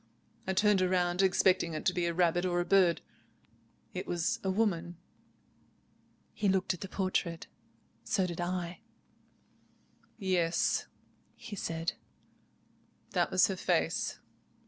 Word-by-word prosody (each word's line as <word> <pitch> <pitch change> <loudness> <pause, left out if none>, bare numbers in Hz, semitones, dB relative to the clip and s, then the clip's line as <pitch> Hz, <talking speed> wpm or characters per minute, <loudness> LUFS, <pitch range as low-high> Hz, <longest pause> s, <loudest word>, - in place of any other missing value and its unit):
I 190 - +1
turned 205 0 +4
round, 180 0 +2
expecting 185 -3 +3
it 155 - -5
to 185 - +3
be 175 -1 0
a 170 - -1
rabbit 175 0 +2
or 175 -1 +1
a 175 - 0
bird. 185 -3 +4 0.9
It - - -5
was 175 +7 0
a 190 - 0
woman." 175 -4 0 1.4
He 205 -2 0
looked 190 0 +2
at 180 - -10
the 195 - -5
portrait. 185 -3 -1 0.6
So 190 - +1
did 175 -1 -4
I. 175 0 -3 1.4
"Yes," 180 -5 +1 0.5
he 215 - -8
said, 165 -3 -2 1.2
"that - - +1
was - - +5
her - - -1
very - - +2
face. - - -3
180 Hz, 130 wpm, -31 LUFS, 170-190 Hz, 1.4 s, was